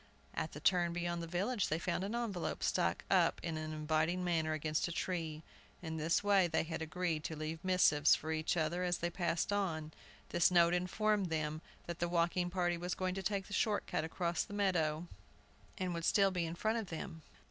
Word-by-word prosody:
At 160 - -3
the - - -7
turn 175 +1 +3
beyond 175 0 -2
the 165 - -5
village, 200 +6 0
they 155 - 0
found 175 +1 -1
an 205 +4 -3
envelope 220 -7 -2
struck - - +1
up - - +4
in 165 -2 -2
an 155 0 -4
inviting 155 +3 0
manner 160 -3 +1
against 155 +1 0
a - - -4
tree. 165 -3 -3 0.4
In 160 -1 -4
this 160 +4 +1
way, 200 -3 +4
they 160 -1 +1
had 160 0 -5
agreed 160 -1 -2
to 160 - -3
leave 155 +2 -5
missives 165 -5 +5
for 155 - -4
each 160 +2 0
other 165 +3 0
as 175 -1 +1
they 175 0 -2
passed 175 +2 0
on. 160 -6 -1 0.4
This 175 - +4
note 170 -1 +5
informed 195 +2 +1
them 155 -1 -2 0.2
that 170 0 -5
the 175 - 0
walking 175 +1 +1
party 175 -1 0
was 180 +1 -3
going 185 -1 -1
to 195 - -3
take 195 0 -1
the 210 - -9
short 210 +1 +1
cut - - -1
across 170 +1 -1
the 205 - -5
meadows, 170 -6 +1 0.7
and 185 -1 -2
would 170 -1 -4
still 195 -1 +4
be 175 -2 -1
in 165 - -5
front 220 +5 0
of 215 - -5
them. 160 0 -6
175 Hz, 210 wpm, -35 LUFS, 160-185 Hz, 0.7 s, missives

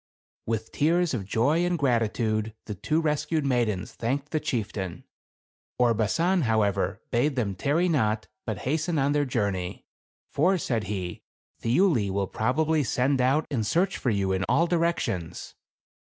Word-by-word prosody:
With 110 -1 -2
tears 170 +2 +2
of 105 -6 -2
joy 145 +11 +2
and 175 0 +1
gratitude 110 -4 0
the 105 - -4
two 155 - 0
res 150 -2 0
cued 155 -1 -1
maidens 120 -8 0
thanked 135 +5 -2
the 155 - +1
chieftain. 100 - -3 0.7
Orbasan, 125 - +2
however, 110 -3 +1
bade 135 +4 +1
them 110 -6 0
tarry 145 - +1
not, 110 -9 +1 0.2
but 110 -3 -2
hasten 155 +4 0
on 140 0 +2
their 145 0 +2
journey. 100 -8 -2 0.5
For, 180 +6 +3
said 115 -9 -1
he, 95 -3 -4 0.4
"Thiuli 120 - +2
will 100 0 -1
proba 125 +10 0
bly 160 0 +2
send 130 +1 +1
out 135 +5 +2
and 120 -6 0
search 175 - +1
for 130 - 0
you 100 -3 +1
in 95 0 0
all 145 +8 +4
directions." 165 - -1
125 Hz, 150 wpm, -26 LUFS, 105-155 Hz, 0.7 s, all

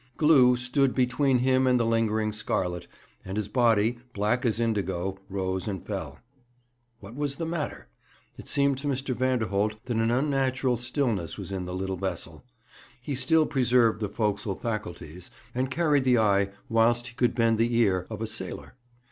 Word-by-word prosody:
Glew 130 -6 +5
stood 125 +2 +1
between 130 +1 +2
him 130 +1 +2
and 125 -1 +4
the 115 - +1
lingering 110 -1 +1
scarlet, 90 -4 -2 0.4
and 95 +2 -5
his 105 -2 -1
body, 115 -1 +2 0.2
black 110 +5 +1
as 115 0 0
indigo, 95 -4 -1
rose 95 -1 -2
and 95 -4 -4
fell. - - -5 0.8
What 100 +3 -10
was 145 +1 -2
the 165 - -4
matter? 150 - -4 0.5
It - - -12
seemed 140 -1 +2
to 145 - -4
Mr. 135 -1 -1
Vanderholt 110 -5 0
that 120 -3 -2
an 115 0 +2
unnatural 130 0 +1
stillness 120 - -1
was - - -7
in 95 -2 -3
the 90 0 -5
little 95 0 -3
vessel. 85 -2 -4 0.6
He 130 +4 -5
still 155 +5 +3
preserved 125 -6 +2
the 105 -2 -2
forecastle 105 -2 -1
faculties, 90 -7 -6 0.2
and 130 +1 -1
carried 150 -1 +2
the 125 -1 +4
eye, 100 -3 +3 0.2
whilst 115 +1 +2
he - - -15
could 120 0 +1
bend 115 -2 +2
the 115 +1 +2
ear, 95 -6 +2
of - - -5
a - - 0
sailor. - - -6
115 Hz, 170 wpm, -27 LUFS, 100-130 Hz, 0.8 s, Glew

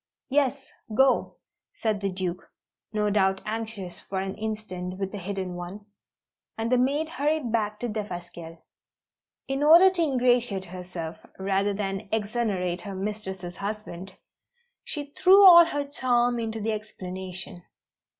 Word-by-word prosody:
"Yes, 275 -1 +1 0.2
go," 265 +2 +3 0.4
said 215 -3 -1
the 200 - 0
Duke, 185 -1 -4 0.4
no 210 -1 0
doubt 190 -2 +2
anxious 215 -4 -5
for 190 - -4
an 190 0 -3
instant 200 -4 -5
with 195 -1 -3
the 205 - -5
hidden 190 -1 -4
one; 175 +4 -7 0.7
and 225 +1 -2
the 250 - +5
maid 285 +5 +1
hurried 300 -5 -1
back 210 -2 0
to 245 - -1
Defasquelle. 175 -6 -6 0.8
In 270 +1 -2
order 335 +6 +8
to 365 -2 -1
ingratiate 245 - +2
herself, 175 -2 -7
rather 195 +1 0
than 195 0 -3
exonerate 205 -5 -1
her 200 -2 -6
mistress's 190 -3 -5
husband, 200 -3 -6 0.7
she 290 -2 -6
threw 390 +2 +7
all 345 -2 +11
her 290 -4 -2
charm 245 -3 +1
into 225 -1 -3
the 220 +1 -1
explanation. 190 -3 -6
210 Hz, 135 wpm, -26 LUFS, 190-245 Hz, 0.8 s, all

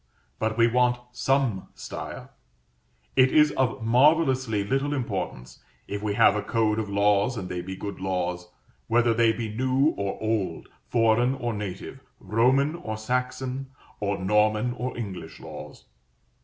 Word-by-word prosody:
But 110 0 -1
we 115 - +6
want 125 +1 +2
some 130 -6 0
style. - - -7 0.8
It 130 0 +5
is 150 -1 +5
of 130 -3 -1
marvellously 130 -3 +3
little 135 +7 0
importance, 65 - -4 0.3
if 100 0 -4
we 105 -1 -1
have - - +5
a 105 - 0
code 110 0 +1
of 105 -2 -3
laws 100 +4 +2
and 95 -4 -4
they 90 -1 -3
be 95 +2 -6
good 100 +1 -6
laws, 90 -2 -2 0.4
whether 120 0 +3
they 115 0 +4
be 110 -2 -4
new 130 +4 +2
or 100 -1 -2
old, 110 -6 -2 0.2
foreign 120 +2 +3
or 120 -3 -3
native, 105 +4 -6 0.2
Roman 125 +8 +2
or 110 -11 -5
Saxon, 125 +3 -2 0.3
or 100 -1 -1
Norman 105 +4 +2
or 125 0 -4
English 95 -8 -6
laws. - - -10
115 Hz, 145 wpm, -26 LUFS, 100-125 Hz, 0.8 s, we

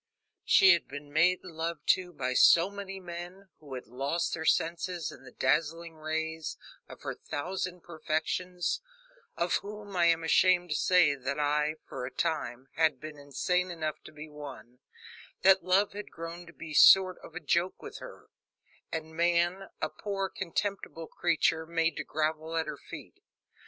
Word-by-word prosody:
She 190 -1 +7
had 170 - -1
been 145 +1 -9
made 175 +4 +3
love 165 -2 -5
to 180 -1 +3
by 130 -6 -2
so 170 +8 +6
many 195 -1 -7
men, 180 +2 -8
who 140 -4 -9
had 125 - -7
lost 140 +8 -2
their 160 -1 -3
senses 170 0 0
in - - -13
the 130 - -12
dazzling 165 +6 0
rays 160 0 -3 0.3
of - - -12
her - - -3
thousand 180 +4 -4
perfections 175 - -2 0.6
of 170 0 +2
whom, 205 -1 -8
I 175 -1 +4
am 165 -1 +3
ashamed 180 +1 +4
to - - +1
say, 180 -4 +4
that 140 +1 -4
I, 150 +1 +1
for 125 -1 -5
a - - -8
time, 135 -5 -2
had 155 -4 +3
been 155 0 -9
insane 180 +6 0
enough 155 -3 -4
to - - -10
be 155 0 -9
one 145 -5 -10 0.6
that 190 0 +6
love 195 +3 +3
had 205 0 -7
grown 170 +1 -8
to 170 - -13
be 160 -1 -9
a - - -5
sort 185 +3 +7
of 165 - -12
joke 175 +2 +1
with - - -8
her, - - -11 0.7
and 160 0 -5
man, 175 +3 +1
a - - +1
poor, 195 -2 -3
contemptible 190 -2 -3
creature, 160 -1 +1
made 165 -1 +1
to - - -2
grovel 155 +1 -2
at 160 - +1
her 150 -2 -6
feet. - - -10
165 Hz, 165 wpm, -30 LUFS, 155-180 Hz, 0.7 s, She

